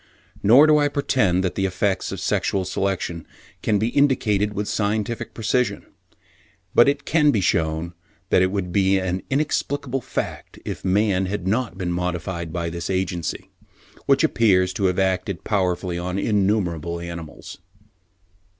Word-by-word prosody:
Nor 125 Hz, +9 st, +7 dB
do 155 Hz, -1 st, +5 dB
I 145 Hz, -, +3 dB
pretend 125 Hz, -10 st, +1 dB
that 95 Hz, -, -1 dB
the 95 Hz, -1 st, 0 dB
effects 95 Hz, +1 st, -1 dB
of -, -, -5 dB
sexual 95 Hz, -2 st, 0 dB
selection 90 Hz, -3 st, -2 dB, 0.4 s
can 105 Hz, -, +1 dB
be 110 Hz, +3 st, 0 dB
indicated 110 Hz, -7 st, +2 dB
with 105 Hz, 0 st, -3 dB
scientific 110 Hz, +2 st, -2 dB
precision; 115 Hz, -2 st, 0 dB, 0.9 s
but 120 Hz, -, +6 dB
it 145 Hz, 0 st, -2 dB
can 150 Hz, -2 st, +3 dB
be 115 Hz, -, +2 dB
shewn 80 Hz, -2 st, 0 dB, 0.4 s
that -, -, +5 dB
it 95 Hz, -, +4 dB
would 95 Hz, -2 st, -3 dB
be 95 Hz, +1 st, +3 dB
an 95 Hz, 0 st, -2 dB
inexplicable 140 Hz, -2 st, -1 dB
fact -, -, -5 dB
if -, -, -5 dB
man 95 Hz, -1 st, +2 dB
had 100 Hz, -1 st, -4 dB
not 110 Hz, -1 st, -1 dB
been 90 Hz, -3 st, -2 dB
modified 90 Hz, -1 st, -3 dB
by 85 Hz, -1 st, -3 dB
this 85 Hz, 0 st, -5 dB
agency, 95 Hz, -3 st, -3 dB, 0.6 s
which 140 Hz, +1 st, +4 dB
appears 95 Hz, -10 st, +3 dB
to 100 Hz, +2 st, -1 dB
have 90 Hz, -1 st, +1 dB
acted 95 Hz, -1 st, -1 dB
powerfully 90 Hz, -3 st, -1 dB
on 90 Hz, +2 st, -3 dB
innumerable 95 Hz, -6 st, 0 dB
animals. 85 Hz, -2 st, -8 dB
95 Hz, 150 wpm, -22 LUFS, 90-110 Hz, 0.9 s, Nor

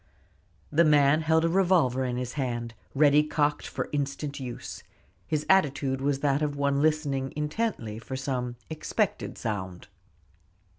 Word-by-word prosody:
The 160 Hz, +3 st, +5 dB
man 150 Hz, -1 st, +5 dB
held 160 Hz, +1 st, +3 dB
a -, -, +4 dB
revolver 165 Hz, -8 st, +3 dB
in 125 Hz, -1 st, -2 dB
his 125 Hz, -1 st, -4 dB
hand, 120 Hz, -5 st, -3 dB, 0.2 s
ready 145 Hz, +1 st, +6 dB
cocked 150 Hz, -1 st, 0 dB
for -, -, -4 dB
instant 145 Hz, 0 st, -3 dB
use. 125 Hz, -3 st, -7 dB, 0.5 s
His 155 Hz, -1 st, -1 dB
attitude 140 Hz, -7 st, +2 dB
was 140 Hz, 0 st, 0 dB
that 145 Hz, 0 st, +2 dB
of 145 Hz, -1 st, -1 dB
one 140 Hz, 0 st, +1 dB
listening 145 Hz, -4 st, 0 dB
intently 150 Hz, -, -2 dB
for 130 Hz, +3 st, -6 dB
some 125 Hz, -2 st, -3 dB
expected 155 Hz, -1 st, -2 dB
sound. 95 Hz, -4 st, -5 dB
140 Hz, 140 wpm, -27 LUFS, 130-155 Hz, 0.5 s, ready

